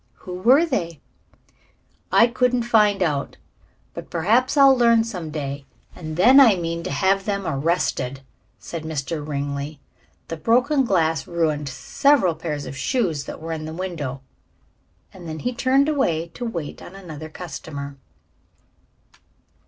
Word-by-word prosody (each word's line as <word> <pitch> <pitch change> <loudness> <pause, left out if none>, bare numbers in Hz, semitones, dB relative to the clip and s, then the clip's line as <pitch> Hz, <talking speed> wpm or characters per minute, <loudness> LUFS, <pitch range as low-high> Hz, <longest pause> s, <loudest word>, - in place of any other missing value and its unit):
"Who 180 - -6
were 245 - +4
they?" 170 - -3 1.1
"I 230 - +6
couldn't 250 0 +1
find 210 -4 +3
out. 145 -5 -2 0.6
But - - -8
perhaps 225 - +1
I'll 275 -1 +7
learn 235 -2 +4
some 180 -8 -6
day, 140 -2 -5 0.3
and 155 -2 -7
then 255 +9 +7
I 235 -7 +7
mean 170 -1 -3
to - - -3
have 190 +7 +1
them 200 -2 -2
arrested," 140 -3 -1 0.4
said 165 - -7
Mr. 155 0 -4
Ringley. 145 0 -4 0.5
"The 165 - -5
broken 255 - +2
glass 165 -6 +1
ruined 155 -4 -1
several 230 - +2
pairs 155 -3 -5
of - - -7
shoes 160 - -1
that - - -7
were 165 +1 -6
in 155 -1 -5
the 160 +1 -6
window." 160 -8 -5 0.9
And 175 -3 -10
then 155 - -5
he 250 +11 -3
turned 265 +3 +2
away 170 - 0
to 245 - -7
wait 170 -10 -5
on 190 - -11
another 160 -5 -9
customer. 145 -4 -7
170 Hz, 145 wpm, -22 LUFS, 155-230 Hz, 1.1 s, I'll